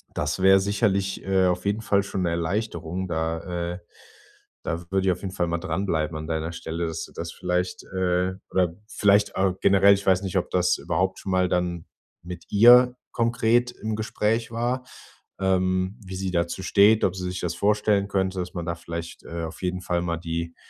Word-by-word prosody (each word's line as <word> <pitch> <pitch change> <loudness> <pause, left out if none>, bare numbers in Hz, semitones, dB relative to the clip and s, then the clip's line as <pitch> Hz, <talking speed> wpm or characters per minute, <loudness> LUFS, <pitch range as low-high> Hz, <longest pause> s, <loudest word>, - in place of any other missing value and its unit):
Das 75 +5 -1
wäre 95 0 +7
sicherlich, 100 -1 0
äh 95 -1 +3
auf 90 +1 -1
jeden 105 +2 0
Fall 100 -2 +2
schon 100 -1 -4
'ne 85 - +1
Erleichterung, 90 0 -2
da, 85 +1 -3
äh 90 - -8 0.8
da 85 +2 -4
würde 95 0 +1
ich 95 - +5
auf 90 - -10
jeden 95 -2 -5
Fall 85 -2 0
mal 85 0 -1
dran 90 +3 -2
bleiben 80 -3 -1
an 80 - -6
deiner 80 +1 -2
Stelle, 85 0 -4
dass 80 0 -4
du - - -17
das 85 0 -5
vielleicht, 90 0 -2
äh 90 0 0 0.2
oder 90 -3 +1
vielleicht, 100 -1 +3
äh, 95 -1 +2
generell, 100 0 +6
ich 100 - -6
weiß 95 0 +3
nicht, 95 0 -2
ob 90 - -1
das 90 -1 +2
überhaupt 95 0 -1
schon 95 - -5
mal 95 0 +3
dann 90 -2 -1 0.4
mit 90 -1 -8
ihr 125 +4 +7 0.2
konkret 115 +1 +2
im 110 -2 -4
Gespräch 110 +1 -1
war, 120 +2 -2 0.5
ähm, 95 0 0
wie 95 - -7
sie 95 0 -3
dazu 85 +2 -1
steht, 105 +3 +5
ob 95 - +1
sie 90 -1 -5
sich 90 - -4
das 90 -1 -2
vorstellen 105 -1 +2
könnte, 95 -1 -1
dass 90 +1 -4
man 85 - -3
da 85 0 -2
vielleicht, 85 0 -7
äh, 85 0 -6
auf 80 +2 -7
jeden 90 0 -2
Fall 90 -1 -1
mal 85 -1 -2
die, 85 0 -4
95 Hz, 200 wpm, -25 LUFS, 85-100 Hz, 0.8 s, wäre